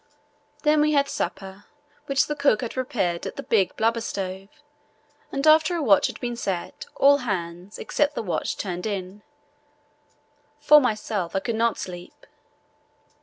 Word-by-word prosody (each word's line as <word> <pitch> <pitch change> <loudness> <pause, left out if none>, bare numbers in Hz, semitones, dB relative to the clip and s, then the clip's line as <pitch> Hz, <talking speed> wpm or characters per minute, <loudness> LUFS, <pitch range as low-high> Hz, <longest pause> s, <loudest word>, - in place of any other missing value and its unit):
Then 300 -1 +4
we 305 0 +2
had 280 -1 +3
supper, 190 -3 -5 0.4
which 275 0 +2
the 295 - -3
cook 285 -7 +2
had 240 - -4
prepared 225 -10 -2
at - - -7
the - - -6
big 195 -5 +1
blubber 230 +1 +1
stove, 195 -2 -5 0.8
and 275 +1 -2
after 315 +2 +5
a 335 - -1
watch 205 -7 +5
had - - -8
been 240 -1 -3
set 190 -6 -4
all 280 +1 +5
hands 185 -5 -5
except 295 0 0
the - - -3
watch 180 - -2
turned 180 0 -4
in." 195 0 -5 1.4
For 300 0 +7
myself, 215 -7 -2
I - - +3
could 230 +4 -3
not 230 -1 +1
sleep. 175 -1 -9
220 Hz, 155 wpm, -24 LUFS, 190-280 Hz, 1.4 s, For